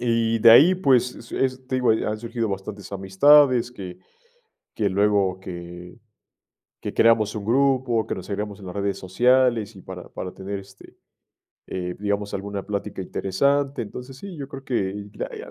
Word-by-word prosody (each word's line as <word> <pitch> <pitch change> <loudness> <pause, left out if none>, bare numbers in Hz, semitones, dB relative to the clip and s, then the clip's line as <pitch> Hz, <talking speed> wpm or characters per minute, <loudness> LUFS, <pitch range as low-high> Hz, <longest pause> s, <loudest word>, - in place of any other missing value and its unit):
y 115 -1 +1
de 115 - +8
ahí, 155 +11 +8
pues, 125 -8 +2
es 115 - -13
es 130 -1 -1
te 130 - 0
digo, 125 -1 +2
han 110 -1 0
surgido 115 -1 -3
bastantes 100 0 -6
amistades, 125 +7 +4
que 90 -6 -8 0.8
que 105 -2 +1
luego 100 -1 +2
que 90 +1 -9 0.8
que - - -5
creamos 115 -2 +4
un 105 - -5
grupo, 125 -2 +2
que - - -2
nos 95 -1 -9
agregamos 105 0 -4
en 95 - -10
las 90 - -7
redes 100 0 -1
sociales, 120 +2 +2
y 95 - -11
para 90 -2 -9
para 90 - -6
tener, 100 +1 -5
este, 95 0 -16 0.7
eh, 90 -1 -4
digamos, 100 0 -2
alguna 100 0 -4
plática 100 -1 -4
interesante. 140 +10 0
Entonces, 125 +4 -9
sí, 190 +4 -9
yo 140 -2 -7
creo 135 -1 -9 0.7
hay, - - -8
ah, - - -12
105 Hz, 165 wpm, -23 LUFS, 95-125 Hz, 0.8 s, de